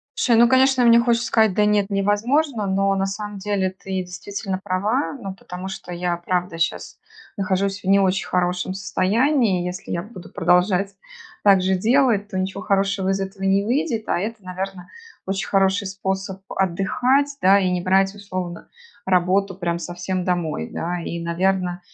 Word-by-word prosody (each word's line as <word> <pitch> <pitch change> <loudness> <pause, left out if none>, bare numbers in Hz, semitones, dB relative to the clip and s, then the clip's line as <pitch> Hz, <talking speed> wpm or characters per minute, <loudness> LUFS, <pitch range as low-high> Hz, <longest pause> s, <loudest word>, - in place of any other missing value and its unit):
Слушай, 235 -3 +3
ну 235 - +7
конечно, 260 0 +4
мне 235 0 +7
хочется 235 +1 +1
сказать: 220 -5 +3
"Да 210 - +3
нет, 210 -1 +2
невозможно." 215 +5 +1
Но 195 +1 +1
на 195 0 0
самом 205 +1 -5
деле 195 -1 -1
ты 190 0 -5
действительно 185 +2 -5
права, 205 +9 -1
ну, 200 -8 -7
потому 185 0 -8
что 190 -2 -8
я, 175 0 -1
правда, 180 -1 -2
щас 165 - -2 0.4
нахожусь 195 0 0
в - - -11
не 195 +1 +5
очень 190 0 +1
хорошем 180 +1 -1
состоянии. 200 +1 +1
Если 180 +1 -6
я 170 - -2
буду 185 -3 -11
продолжать 180 +2 +2 0.5
так 195 -2 +6
же 190 0 +2
делать, 225 0 +2
то 190 - -4
ничего 190 +1 -3
хорошего 195 -1 0
из 195 0 0
этого 195 0 -6
не 195 +1 +2
выйдет, 235 -1 -1
а - - +1
это, 215 0 -5
наверно, 185 0 -6 0.4
очень 190 -1 -2
хороший 195 +1 +2
способ 190 0 -4
отдыхать, 250 +10 +1
да, 195 +2 +6
и 185 -2 +1
не 180 -1 0
брать 190 +2 +2
условно 185 -4 -6 0.4
работу 190 +2 +2
прям 170 -2 -2
совсем 175 +1 -4
домой, 165 - -1
да. 175 +1 -3
И, 170 0 -4
наверно, 180 +1 0
195 Hz, 165 wpm, -22 LUFS, 185-205 Hz, 0.5 s, ну